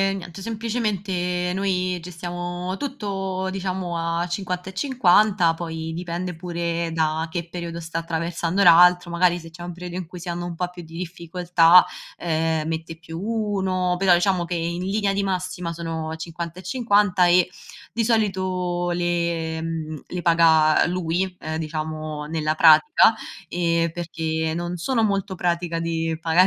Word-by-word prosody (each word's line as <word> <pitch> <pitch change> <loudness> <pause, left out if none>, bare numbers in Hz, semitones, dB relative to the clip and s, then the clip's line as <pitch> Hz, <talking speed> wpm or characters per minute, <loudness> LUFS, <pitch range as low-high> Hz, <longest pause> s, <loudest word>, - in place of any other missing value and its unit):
niente, 175 0 -8
semplicemente 200 -6 -2
noi 185 -2 0
gestiamo 175 +1 -5
tutto, 195 -8 -3
diciamo, 185 -2 -3
a 170 +1 -1
50/50, 190 - +2
poi 160 -1 -5
dipende 175 +1 -4
pure 170 -1 -2
da 160 0 0
che 170 0 -4
periodo 170 -1 -6
sta 165 0 -4
attraversando 170 +3 -1
l'altro. 175 0 +6
Magari 175 0 +3
se 165 -1 -10
c'è 170 - -12
un 175 0 -5
periodo 180 0 -7
in 180 -3 -5
cui 180 +1 -9
si 175 +1 -7
hanno 175 0 -3
un 175 - -6
po' 180 +1 -1
più 175 -1 -9
di 165 0 -11
difficoltà, 175 0 +4 0.3
ehm, 160 -1 0
mette 165 0 -4
più 165 0 -8
1, 190 -5 0
però 190 -2 +5
diciamo 175 -1 +1
che 175 - -3
in 170 +1 -2
linea 200 +1 0
di 200 - 0
massima 180 -2 -2
sono 160 -1 -4
50/50 180 +4 +1
e 175 0 +5 0.5
di 230 - +1
solito 185 -5 0
le 170 -2 -1 0.5
le 180 -1 -4
paga 160 -2 +5
lui, 180 +1 -1
ehm, 155 0 -4
diciamo, 155 -1 -4
ehm, 150 - -9
nella 155 -1 0
pratica, 165 - +6 0.8
perché 160 -2 -2
non 175 +1 -3
sono 230 +6 0
molto 195 -2 0
pratica 170 -1 -1
di 165 -1 -1
pagare 170 +3 +4
175 Hz, 145 wpm, -23 LUFS, 165-185 Hz, 0.8 s, l'altro